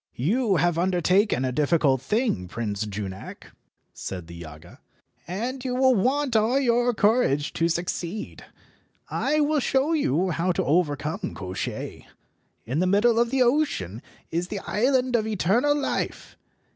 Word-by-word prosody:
"You 205 - +1
have 170 +1 +2
undertaken 180 - +2
a 130 - -1
difficult 145 -2 +2
thing, 210 - 0
Prince 105 +1 -3
Junak," 95 -11 -7 0.4
said 90 -3 -6
the 85 - -11
Yaga, 85 0 -11 0.5
"and 240 +9 -4
you 250 -1 -2
will 260 0 +4
want 255 +4 +1
all 225 +5 +3
your 245 -2 +2
courage 205 - +2
to 165 0 +1
succeed. 175 +3 -4 0.7
I 300 +3 +1
will 300 0 +2
show 275 +4 +1
you 185 - +1
how 175 +3 0
to - - 0
overcome 150 0 0
Koshchei. 95 -2 -5 0.6
In 130 +7 -2
the 185 - +2
middle 225 +5 +3
of 235 0 +2
the 265 0 +3
ocean 240 - 0 0.3
is 170 +2 -1
the 205 - -4
island 255 +2 +1
of 220 -2 +1
eternal 220 - +2
life. 290 - -3
185 Hz, 145 wpm, -25 LUFS, -, 0.7 s, will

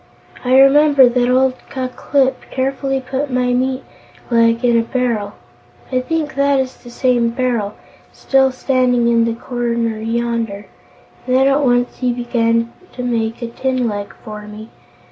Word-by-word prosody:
I 255 +1 +3
remember 280 -1 +6
that 245 0 +1
old 260 +1 +3 0.2
Ku 260 -1 -3
Klip 265 +1 -1
carefully 270 +1 -1
put 265 +2 -3
my 250 -1 0
meat 260 +1 -1 0.5
leg 230 +1 +3
into 235 -1 +4
a - - +3
barrel 230 -4 -2 0.6
I 255 - +1
think 305 +3 -2
that 280 0 +2
is 260 -1 -3
the 240 - -14
same 240 -1 +1
barrel, 235 -4 -2 0.4
still 265 -1 +2
standing 255 -2 +1
in 230 -1 +3
the 230 -1 -1
corner 235 -2 -2
yonder 230 -2 -2 0.6
and 255 - +1
then 265 +1 +4
at 275 +1 +2
once 245 -1 +1
he 250 -1 +1
began 235 -1 0 0.2
to 250 - -6
make 230 -1 -2
a - - -2
tin 255 +1 -1
leg 205 -2 -5
for 210 -1 -8
me. 215 +2 -10
245 Hz, 160 wpm, -17 LUFS, 230-265 Hz, 0.6 s, remember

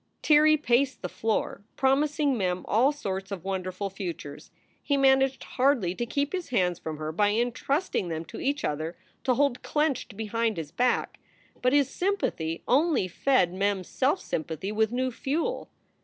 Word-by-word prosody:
Tirrey 310 0 +6
paced 260 -2 +1
the 180 - -2
floor, 210 +3 -1
promising 285 +1 +2
Mem 185 -4 -1
all 245 +7 +4
sorts 195 -9 -4
of 195 -4 -5
won 190 -1 -2
derful 185 +2 -4
futures. 170 -7 -7 0.3
He 285 - +1
managed 270 -1 +3
hardly 250 -9 +1
to 235 +5 -3
keep 280 +6 -1
his 365 -2 -3
hands 180 -8 +1
from 155 -1 -5
her 155 0 -4
by 205 +6 +2
intrusting 245 - 0
them 165 0 -4
to - - -9
each 285 +2 -1
other 155 +3 -3 0.3
to 255 -2 +3
hold 280 -2 +1
clenched 295 -9 -1
behind 225 0 -1
his 155 -3 -5
back. 250 +8 0 0.4
But 250 +1 +2
his 285 -2 +4
sympathy 260 - -2
only 285 - +3
fed 185 -2 +2
Mem 195 0 0
s 180 - -13
self 285 +8 +1
sympathy 160 +4 -4
with 220 0 +1
new 255 +1 0
fuel. 320 - -2
235 Hz, 170 wpm, -27 LUFS, 185-275 Hz, 0.4 s, Tirrey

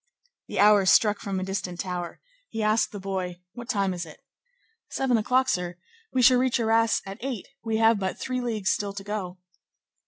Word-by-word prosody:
The - - -6
hour 205 -2 +6
struck 210 +1 +5
from 195 -2 -3
a - - -3
distant 190 -2 -4
tower; 180 -2 -4 0.3
he 225 - -3
asked 215 +1 +2
the 205 - -7
boy:— 185 -2 -4
"What 240 -1 -9
time 195 -2 +1
is 175 -1 -4
it?" 155 -3 -13 0.7
"Seven 265 -2 +1
o'clock, 250 +4 +2
sir; 180 -6 -1 0.4
we 255 - +1
shall 250 0 +7
reach 255 -1 +1
Arras 225 0 +2
at 195 +3 -8
eight; 255 -7 -4 0.2
we 225 -1 -1
have 225 -1 +4
but 190 -1 -2
three 255 -1 -3
leagues 220 -5 -1
still 200 -1 -2
to 200 0 -7
go." 195 -3 -4
205 Hz, 190 wpm, -26 LUFS, 190-230 Hz, 0.7 s, shall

